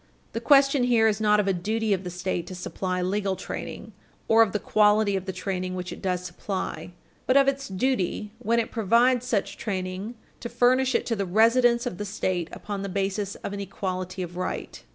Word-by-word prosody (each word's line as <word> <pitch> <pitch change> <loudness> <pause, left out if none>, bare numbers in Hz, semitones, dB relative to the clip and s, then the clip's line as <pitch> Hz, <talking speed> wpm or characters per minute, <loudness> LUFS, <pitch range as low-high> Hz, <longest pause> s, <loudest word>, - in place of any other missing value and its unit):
The 230 - -3
question 275 0 +5
here 230 -3 +4
is 215 0 0
not 210 -1 +4
of 205 - +1
a 195 - +3
duty 215 +4 0
of 190 -1 -2
the 180 - -5
State 180 -1 -3
to 185 - -7
supply 180 0 -3
legal 195 +1 0
training, - - -7 0.3
or 225 0 +6
of 220 -4 +4
the 210 - 0
quality 210 0 +3
of 190 -1 -3
the 190 - -3
training 185 0 -3
which 180 -1 -5
it - - -11
does 180 -1 -1
supply, 175 -2 -5 0.3
but 260 - +5
of 275 -1 +5
its 275 0 0
duty 205 0 -1
when 235 -1 +1
it 230 - -2
provides 240 +3 +3
such 215 -6 -1
training 190 +2 -4 0.2
to 235 - -6
furnish 255 +2 +3
it - - +1
to 230 - 0
the 200 -2 -2
residents 235 +4 +4
of 180 - -4
the 205 - -3
State 185 -4 -2
upon 205 -1 -5
the 200 - -4
basis 195 +1 -2
of 200 - -3
an 200 - -4
equality 185 -1 -4
of 175 0 -8
right. 185 - -4
200 Hz, 210 wpm, -26 LUFS, 185-230 Hz, 0.3 s, or